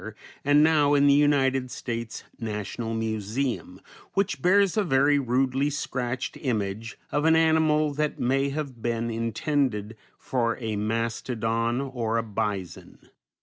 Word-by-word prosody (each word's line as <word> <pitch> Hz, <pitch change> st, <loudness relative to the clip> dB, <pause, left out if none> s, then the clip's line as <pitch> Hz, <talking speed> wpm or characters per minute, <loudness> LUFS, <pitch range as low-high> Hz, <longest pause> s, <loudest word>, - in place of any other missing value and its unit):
and 145 Hz, +1 st, +5 dB
now 150 Hz, -2 st, +4 dB
in 140 Hz, 0 st, +4 dB
the 140 Hz, -, +6 dB
United 135 Hz, -3 st, +3 dB
States 115 Hz, -2 st, -5 dB, 0.2 s
National 110 Hz, +1 st, -4 dB
Museum, 110 Hz, -1 st, -3 dB, 0.4 s
which 195 Hz, 0 st, 0 dB
bears 195 Hz, +1 st, +4 dB
a 215 Hz, -, +2 dB
very 145 Hz, -2 st, +3 dB
rudely 135 Hz, +2 st, +1 dB
scratched 130 Hz, -3 st, -3 dB
image 110 Hz, -3 st, -2 dB
of 145 Hz, -, 0 dB
an 160 Hz, 0 st, +5 dB
animal 160 Hz, -2 st, +3 dB
that 150 Hz, +1 st, -2 dB
may 135 Hz, +3 st, +1 dB
have 140 Hz, -5 st, -5 dB
been 115 Hz, 0 st, -1 dB
intended 115 Hz, -1 st, -1 dB, 0.2 s
for 120 Hz, -3 st, -1 dB
a 110 Hz, -3 st, -3 dB
mastodon 115 Hz, +2 st, -1 dB
or 120 Hz, -5 st, -2 dB
a 115 Hz, -, 0 dB
bison. 105 Hz, -5 st, -5 dB
125 Hz, 130 wpm, -26 LUFS, 115-145 Hz, 0.4 s, the